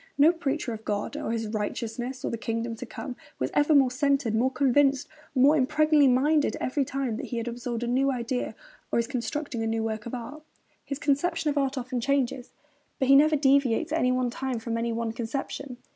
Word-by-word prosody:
No 295 +4 +7
preacher 285 -7 -2
of 220 0 -8
God 205 -1 -3
and - - -3
of 215 - -6
righteousness 240 +4 -3
and - - -2
the - - -1
kingdom 230 0 -3
to - - -7
come 255 - -7 0.2
was 130 - -2
ever 295 +1 +4
more 270 -3 +5
centred, 275 -3 +1
more 235 +4 +2
convinced, 270 +1 +2 0.3
more 275 +4 +6
impregnably 305 +1 +4
minded 290 +4 +3
every 275 +2 0
time 260 -4 -2
that - - -5
he 240 - -4
has 230 +1 -3
absorbed 240 0 -4
a - - -2
new 265 +3 +2
idea 250 0 -3 0.4
or - - +1
is 235 - +2
constructing 250 0 -3
a 225 - -1
new 225 0 -1
work 220 0 -3
of 235 - -4
art. 285 +6 -7 0.4
His 280 - -4
conception 295 +2 +1
of 290 - -4
art 275 0 -1
often 250 -1 -3
changes; 265 -1 0 0.5
but 265 - 0
he 275 - +8
never 305 +2 +6
deviates 275 0 +2
at 320 - +1
any 250 - +2
one 255 -1 0
time 260 0 -3
from 230 0 -3
any 230 0 -1
one 230 0 -2
conception. 245 +2 -5
255 Hz, 210 wpm, -27 LUFS, 235-280 Hz, 0.5 s, he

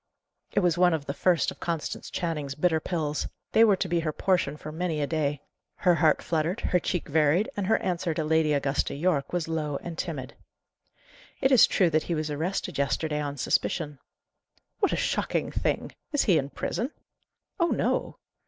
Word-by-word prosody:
It - - +3
was 175 -2 +2
one 180 -2 +5
of 145 -3 -5
the 140 - -3
first 170 0 +2
of - - -12
Constance 165 -3 -3
Channing's 150 -5 -3
bitter 160 +1 +2
pills; 155 -3 -2 0.2
they 225 - +6
were 210 -3 +6
to 190 - -2
be 170 -1 +1
her 160 -2 -1
portion 175 -4 0
for 155 - -8
many 165 -1 -2
a 145 - +1
day. 145 -2 -1 0.3
Her 180 -2 +3
heart 160 -2 +3
fluttered, 165 +2 0
her 180 - +2
cheek 175 0 -2
varied, 155 +6 +2
and 200 -2 -2
her 220 - +4
answer 175 -2 -1
to 160 - 0
Lady 160 0 +2
Augusta 140 -1 0
Yorke 145 -2 0
was 175 -3 -1
low 155 -3 -2
and 170 -1 -6
timid. 140 -5 -4 1.1
"It 265 - +2
is 255 - +8
true 180 -5 +2
that 155 0 +3
he 170 - +1
was 155 -1 -2
arrested 160 +2 -2
yesterday 150 +2 0
on 145 -1 -4
suspicion." 150 +2 -1 0.8
"What 400 - +2
a - - +1
shocking - - -1
thing! - - -1 0.2
Is 290 - +2
he 180 -7 +4
in 140 0 -4
prison?" 235 - -3 0.7
"Oh 340 - +4
no." - - 0
160 Hz, 190 wpm, -27 LUFS, 150-180 Hz, 1.1 s, is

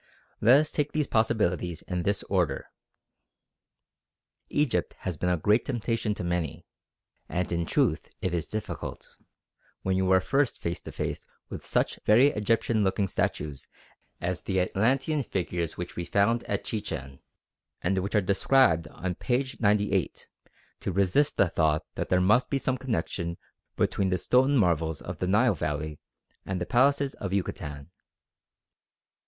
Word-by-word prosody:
Let 120 +6 +7
us 155 0 -1
take 150 -1 -1
these 155 -1 +1
possibilities 100 - 0
in 90 -1 -2
this 100 +3 0
order. 90 -8 -1 1.8
Egypt 145 -3 0
has 90 - -3
been 90 +4 -1
a 90 - +2
great 105 +8 +3
temptation 115 -3 -1
to - - -5
many, 85 -3 -2 0.6
and 90 0 -2
in 85 -1 -1
truth - - +1
it 90 - -2
is 85 -3 -1
difficult, 110 -1 -6 0.7
when 95 0 +1
you 95 0 +1
are 95 - +6
first 135 +8 0
face 85 0 -3
to - - -8
face - - -4 0.2
with - - -7
such - - 0
very 120 +7 +6
Egyptian 110 -1 +1
looking 95 +1 +1
statues 75 -5 -2 0.5
as 90 0 -2
the 95 -1 -1
Atlantean 130 - +1
figures 85 - -3
which 90 0 -6
we 85 - -3
found 110 +6 +2
at 100 - -2
Chichen, 70 - -5 0.6
and 95 +2 +1
which 100 +4 -3
are 105 - +5
described 95 - +3
on 90 +4 -4
p. 125 +8 0
98, 100 -3 +1 0.5
to - - -3
resist 100 +11 +2
the 95 - +5
thought 80 -2 +1
that - - -4
there 90 - +4
must 105 +7 +3
be 140 - +1
some 130 -1 0
connection 85 -9 -3 0.4
between 95 -1 +1
the 90 - +1
stone 130 +9 +3
marvels 85 - +1
of - - -7
the - - -1
Nile - - +4
Valley 75 0 -3 0.4
and 95 -1 -3
the 90 - -2
palaces 140 +5 +3
of 95 -1 -5
Yucatan. 80 -6 -4
95 Hz, 150 wpm, -28 LUFS, 85-115 Hz, 1.8 s, Let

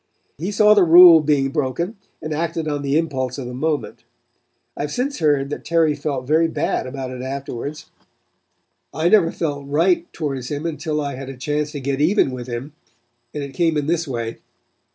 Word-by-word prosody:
He 175 +5 -3
saw 210 +1 +5
the 205 -3 +5
rule 170 0 +9
being 145 -2 +1
broken 160 - -2 0.3
and 155 0 -3
acted 165 +1 -2
on 145 -1 -2
the 140 +1 +1
impulse 130 -6 -2
of 135 - -5
the 125 - -6
moment. 150 +3 -3 0.7
I - - -5
have 145 0 -3
since 275 - -2
heard 145 -3 +1
that - - -5
Terry 165 -2 +2
felt 140 -3 -4
very 160 +4 +3
bad 160 -4 -2
about 130 -1 -5
it 125 -1 -7
afterwards. 135 +2 -6 1.0
I 160 +2 +2
never 180 -6 +4
felt 145 -4 -4
right 170 +4 +1
towards 135 -5 -4
him 145 +2 -4
until 155 -2 -2
I 140 -1 -3
had 135 +1 -7
a 135 - -8
chance 150 +3 -2
to 145 - -4
get 140 +1 -2
even 160 -3 +3
with 125 -1 -7
him, 125 +4 -6 0.6
and 145 +2 -5
it 140 -1 -8
came 165 +2 +1
in 145 - -1
this 170 +1 -1
way. 115 -3 -4
150 Hz, 195 wpm, -21 LUFS, 135-165 Hz, 1.0 s, rule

